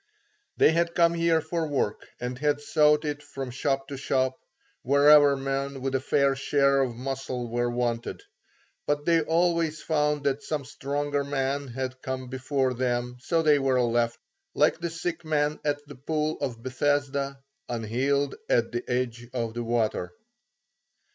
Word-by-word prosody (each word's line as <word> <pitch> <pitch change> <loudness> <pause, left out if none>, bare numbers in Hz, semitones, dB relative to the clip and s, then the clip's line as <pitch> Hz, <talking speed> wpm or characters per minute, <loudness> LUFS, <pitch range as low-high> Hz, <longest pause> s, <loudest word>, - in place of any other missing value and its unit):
They - - +6
had 170 +1 0
come 170 -1 +4
here 165 -1 +2
for 160 +1 -2
work 135 -8 -2
and 125 +1 -3
had 145 0 +1
sought 150 0 +3
it 145 -1 -3
from 135 -3 -6
shop 135 +2 -1
to 140 - -5
shop, 130 -1 +1 0.5
wherever 145 +1 +6
men 135 0 -2
with 135 0 -2
a 135 - +2
fair 140 0 +2
share 140 0 +2
of 125 -3 -1
muscle 130 -1 -4
were 120 +1 0
wanted; 120 - -2 0.6
but 145 0 0
they 165 -1 +4
always 165 -1 +1
found 150 -2 +1
that 140 0 0
some 150 -3 -3
stronger 145 +1 -2
man 140 0 -1
had 130 +1 -5
come 130 -1 -4
before 130 0 0
them 125 0 -1
so 165 +5 0
they 150 -2 +5
were 135 -2 +2
left, 120 -1 +1 0.4
like - - +3
the 170 0 -2
sick 165 +1 -4
man 150 -1 0
at 145 0 -1
the 145 - -10
Pool 155 +3 -2
of 120 -5 -3
Bethesda, 140 +1 0 0.3
unhealed 130 +5 0 0.2
at 115 -1 +2
the 120 +1 -3
edge 120 -1 -2
of 115 -2 -2
the 120 0 -3
water. 115 - -1
140 Hz, 160 wpm, -27 LUFS, 125-150 Hz, 0.6 s, They